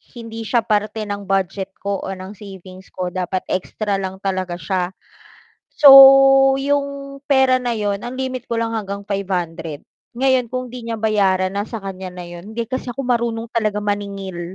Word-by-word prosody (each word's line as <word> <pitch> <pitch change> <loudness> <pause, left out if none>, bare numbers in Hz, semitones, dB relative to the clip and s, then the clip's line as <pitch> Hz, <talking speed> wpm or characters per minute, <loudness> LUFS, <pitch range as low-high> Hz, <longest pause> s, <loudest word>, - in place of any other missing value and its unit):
hindi 230 -1 -7
siya 235 +2 +2
parte 215 0 -1
ng 205 0 -5
budget 195 0 -1
ko 200 0 -2
o - - -5
ng 185 +1 -9
savings 190 -2 -11
ko. 180 -1 -3
Dapat 185 0 -3
extra 200 +2 -2
lang 190 0 -4
talaga 185 -2 -2
siya. 180 +2 -2 0.8
So 295 - +7 0.7
'yong 280 0 -2
pera 265 -2 +4
na 240 -1 -1
'yon 205 -1 -1
ang 245 - -6
limit 260 -2 -4
ko - - 0
lang 230 0 -1
hanggang 200 -1 -5
500. 175 -6 -3 0.3
Ngayon 260 -1 +2
kung 255 0 -3
'di 245 -2 -8
niya 225 - -2
bayaran 195 -4 +1
nasa 210 +3 -3
kanya 190 -1 -6
na 180 0 -8
'yon. 175 +5 -10
Hindi 235 0 -2
kasi 260 -1 -3
ako 270 +3 -5
marunong 235 -2 -1
talaga 215 -3 0
maningil. 200 -3 -4
205 Hz, 170 wpm, -20 LUFS, 190-235 Hz, 0.8 s, So